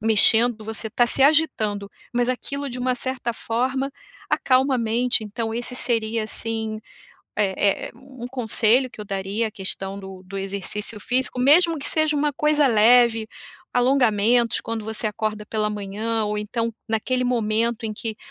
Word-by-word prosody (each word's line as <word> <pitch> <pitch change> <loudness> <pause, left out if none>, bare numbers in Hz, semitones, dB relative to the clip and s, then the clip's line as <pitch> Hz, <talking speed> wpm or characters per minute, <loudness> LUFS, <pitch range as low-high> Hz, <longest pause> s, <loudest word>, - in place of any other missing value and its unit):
mexendo, 225 +1 +4
você 220 +1 -1
tá 240 +3 +2
se 240 - +2
agitando, 220 -10 +1 0.2
mas 245 0 +1
aquilo, 280 +2 -3
de 250 - -7
uma 250 0 0
certa 255 -1 -1
forma, 260 +5 -2 0.4
acalma 260 +1 +2
a - - -3
mente, 230 0 0
então 225 +2 -4
esse 240 +2 -2
seria 230 -2 +1
assim 220 0 -1 0.6
é 200 -1 0
é - - -11
um 260 0 -11
conselho 250 0 +1
que 230 - -12
eu - - -6
daria, 200 +3 -3
a - - -12
questão 195 0 +1
do 190 -1 -11
do 195 +1 -8
exercício 200 +2 -2
físico, 255 +4 -1
mesmo 320 +6 +4
que 280 - -2
seja 310 -1 +2
uma 295 0 0
coisa 300 +1 +2
leve, 230 -1 +4 0.4
alongamentos 245 -2 +2
quando 225 -1 -5
você 220 0 -2
acorda 215 0 -3
pela 215 -1 -1
manhã, 210 +2 -3
ou 210 0 -2
então 230 +2 -3 0.2
naquele 240 +3 -1
momento 230 -1 -1
em 215 - -4
que 220 +1 -6
230 Hz, 160 wpm, -22 LUFS, 215-250 Hz, 0.6 s, mexendo